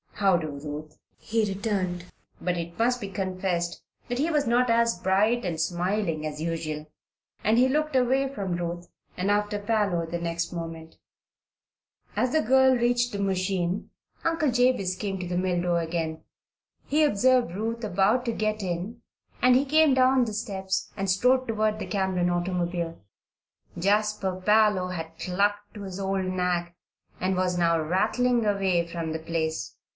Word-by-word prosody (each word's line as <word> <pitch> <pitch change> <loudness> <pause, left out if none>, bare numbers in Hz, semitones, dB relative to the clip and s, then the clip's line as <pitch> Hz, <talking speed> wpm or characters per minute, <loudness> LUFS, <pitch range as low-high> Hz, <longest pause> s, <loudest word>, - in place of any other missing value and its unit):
"How 195 -3 +3
do, 160 -2 -4
Ruth," 150 +1 -7 0.2
he 225 0 0
returned; 195 -3 -2 0.3
but 180 -1 -1
it 170 0 -5
must 245 +2 +1
be 200 - -4
confessed 185 -2 -2 0.2
that 245 0 -2
he 310 +4 +1
was 300 -3 +1
not 245 +1 +2
as 230 -2 +3
bright 210 +6 +2
and 165 -3 -2
smiling 175 -1 -1
as 150 0 -6
usual, 155 -2 -4 0.5
and 220 +2 +3
he 255 +1 +5
looked 305 +1 0
away 260 +2 +3
from 195 -9 -3
Ruth 175 0 -4 0.3
and 190 +3 +1
after 210 0 +1
Parloe 205 -5 0
the 170 +1 -3
next 170 0 -3
moment. 165 -1 -7 1.2
As 250 - +1
the 315 - +3
girl 265 +2 +5
reached 245 0 +1
the 200 - -4
machine 185 -1 -1 0.3
Uncle 325 -4 +1
Jabez 245 -7 +2
came 195 0 -3
to 180 - -4
the 175 0 -2
mill 180 -1 0
door 175 -1 +1
again. 160 -1 -3 0.6
He 305 +2 +2
observed 250 - +3
Ruth 230 +3 -3
about 210 +4 +2
to 235 - 0
get 215 -1 -1
in 190 +6 -4 0.4
and 250 0 +6
he 265 +3 +3
came 305 -1 +4
down 260 -1 +4
the 220 - -4
steps 190 -3 -3
and 195 -1 -2
strode 255 +7 +3
toward 215 -1 0
the - - -5
Cameron 190 -3 0
automobile. 175 -1 -2 0.8
Jasper 205 0 +1
Parloe 210 -3 +4
had 165 -2 -6
clucked 205 +3 -1
to 205 - -7
his 190 -1 -6
old 195 -1 -1
nag 180 -2 -1 0.5
and 185 +1 0
was 180 -1 0
now 170 -1 +3
rattling 225 +8 +1
away 190 -4 +1
from 165 -1 -4
the 160 - -3
place. 160 -1 -3
195 Hz, 160 wpm, -26 LUFS, 175-230 Hz, 1.2 s, and